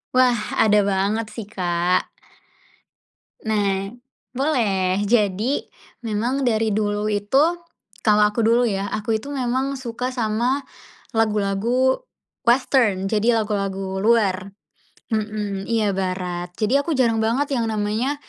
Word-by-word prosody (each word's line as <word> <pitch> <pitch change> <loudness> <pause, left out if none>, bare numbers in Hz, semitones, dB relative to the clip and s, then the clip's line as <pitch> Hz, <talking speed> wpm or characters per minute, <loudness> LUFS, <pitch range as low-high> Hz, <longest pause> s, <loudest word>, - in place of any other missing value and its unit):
Wah 245 -4 +2
ada 210 -1 +5
banget 200 +4 0
sih, 225 -4 -7
Kak. 180 -3 0 1.4
Nah, 195 -2 0 0.5
boleh. 205 -10 +1
Jadi 215 +3 +1 0.4
memang 230 +5 -1
dari 220 -3 +1
dulu 210 0 0
itu 210 +7 +2 0.6
kalau 210 -1 +5
aku 210 +2 -1
dulu 235 +2 +4
ya, 200 -1 -2
aku 215 +1 -1
itu 285 +5 -8
memang 265 +1 -1
suka 250 +1 -4
sama 245 +3 0 0.5
lagu-lagu 225 - +1 0.4
western, 235 -6 +3
jadi 220 +2 +2
lagu-lagu 195 -2 -3
luar, 200 -4 +2 0.6
mhm. 210 -2 -2
Iya 220 -3 +2
barat. 180 -2 -3
Jadi 225 +6 +2
aku 305 +3 -1
jarang 235 -4 +2
banget 270 +5 0
yang 230 - 0
namanya 215 +6 -1
215 Hz, 115 wpm, -22 LUFS, 200-240 Hz, 1.4 s, ada